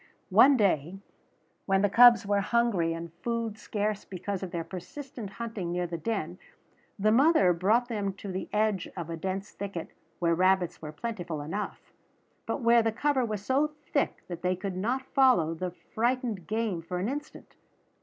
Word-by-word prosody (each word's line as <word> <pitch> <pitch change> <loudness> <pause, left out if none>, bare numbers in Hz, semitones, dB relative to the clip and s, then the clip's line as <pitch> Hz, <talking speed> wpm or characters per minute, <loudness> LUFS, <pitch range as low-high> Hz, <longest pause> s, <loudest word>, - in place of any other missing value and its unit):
One 275 -1 +7
day, 185 - +1 0.7
when 195 0 +3
the - - +5
cubs 235 +2 +7
were 200 0 +2
hungry 200 -6 +1
and 165 0 -7
food 230 -2 -2
scarce 210 -1 -2
because 195 +1 -5
of 190 - -4
their 170 -1 -3
persistent 225 - -8
hunting 220 -7 -4
near 180 0 -1
the 170 -1 -5
den, 180 -2 -3 0.6
the 215 +1 +3
mother 255 - +5
brought 215 +8 +2
them 205 -5 -2
to 200 0 -7
the 185 +1 -4
edge 210 -3 0
of 170 -1 -5
a - - -2
dense 190 +4 -4
thicket 195 -4 -6 0.3
where 170 -1 +2
rabbits 185 0 +2
were 155 -1 -6
plentiful 175 -3 -5
enough, 195 +8 -5 0.5
but - - -2
where 235 0 +5
the 225 0 +1
cover 265 +3 +1
was 210 -3 -3
so 290 +3 +1 0.2
thick - - 0
that 175 -2 -6
they 180 0 +1
could 190 0 -5
not 245 +8 -1
follow 250 - +4
the 180 +2 -3
frightened 225 - -2
game 215 -5 -1
for 180 +2 -5
an 185 +3 -1
instant. 295 +4 -7
200 Hz, 175 wpm, -28 LUFS, 180-235 Hz, 0.7 s, One